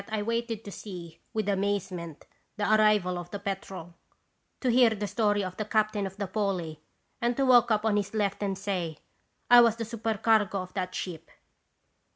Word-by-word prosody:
I 215 -1 -1
waited 230 0 -2
to 200 - -7
see, 175 -5 -9
with 215 -2 -2
amazement, 195 -5 -2 0.3
the 210 - -2
arrival 210 -4 +3
of 175 0 -8
the 205 - -5
Petrel, 195 -3 -6 0.7
to 255 - +2
hear 245 0 +6
the 210 -2 -3
story 205 -1 +1
of 185 -1 -6
the 215 - -2
captain 215 -2 +1
of 190 +1 -11
the 205 - -2
Polly, 185 -6 -2 0.4
and 235 0 0
to 275 - +2
walk 245 -2 +6
up 215 -1 +1
on 210 -2 +2
his 205 +1 -2
left 200 -2 0
and 195 -2 -1
say: 175 -7 -3 0.3
" - - -46
'I 245 0 +10
was 230 -2 +4
the 230 0 -4
supercargo 220 -2 +1
of 185 - -13
that 185 -2 -3
ship.' 170 -4 -6
205 Hz, 190 wpm, -28 LUFS, 185-220 Hz, 0.7 s, I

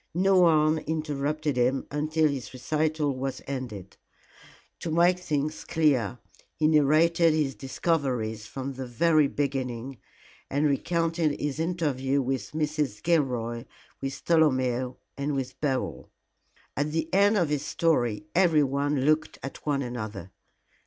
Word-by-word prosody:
No 190 +1 +4
one 155 -2 +4
interrupted 150 -2 -2
him 125 +2 +1
until 155 +2 +1
his 140 -4 -4
recital 150 +1 0
was 130 0 -3
ended. 120 -9 -6 0.8
To 170 - -4
make 175 +3 +3
things 155 -3 -2
clear, 135 -9 +1 0.4
he 155 - +2
narrated 160 +2 +4
his 145 -3 0
discoveries 130 -7 -2
from 135 +3 -5
the 130 -1 -6
very 155 +5 +3
beginning, 130 -3 -3 0.5
and 145 +2 +1
recounted 165 +1 0
his 145 0 -2
interview 145 -6 0
with 130 -3 -2
Mrs. 150 -7 -2
Gilroy, 125 -7 0 0.4
with 135 0 -5
Tolomeo 130 -6 +2 0.2
and 140 +1 -1
with 130 -2 -4
Beryl. 135 -3 -2 0.7
At 145 +2 0
the 160 0 -1
end 200 +2 +4
of 170 -6 +2
his 150 -2 -1
story 150 -7 0
everyone 145 -5 +2
looked 155 +3 +1
at 135 - -7
one 140 -2 +1
another. 110 -7 -6
145 Hz, 125 wpm, -27 LUFS, 130-155 Hz, 0.8 s, No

